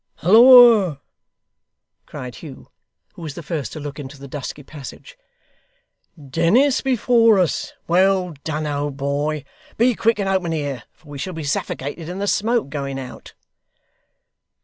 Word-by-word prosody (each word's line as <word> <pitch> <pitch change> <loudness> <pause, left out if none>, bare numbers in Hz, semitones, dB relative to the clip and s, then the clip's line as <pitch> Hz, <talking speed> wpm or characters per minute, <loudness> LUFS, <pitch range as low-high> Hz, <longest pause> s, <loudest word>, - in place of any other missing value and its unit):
'Halloa!' 225 - +7 1.1
cried 125 -1 -8
Hugh, 145 -5 -12 0.4
who - - -13
was 155 -4 -7
the 170 - -8
first 150 -1 -4
to 155 - -7
look 145 0 -7
into 140 0 -9
the 140 0 -11
dusky 145 +1 -7
passage: 150 - -11 1.0
'Dennis 170 - +2
before 235 -4 +3
us! 180 -4 -1
Well 185 0 +2
done, 155 -1 -3
old 145 -1 -3
boy. 145 +1 -2 0.3
Be 240 +2 +3
quick, 230 0 +1
and 200 -2 -2
open 185 -3 0
here, 140 -7 -4
for 160 - -25
we 145 -1 -8
shall 185 +6 -5
be 160 -1 -6
suffocated 145 +3 -4
in 180 - -6
the 200 - -2
smoke, 225 -2 0
going 140 -2 -4
out. 130 -2 -10
160 Hz, 145 wpm, -20 LUFS, 145-200 Hz, 1.1 s, Halloa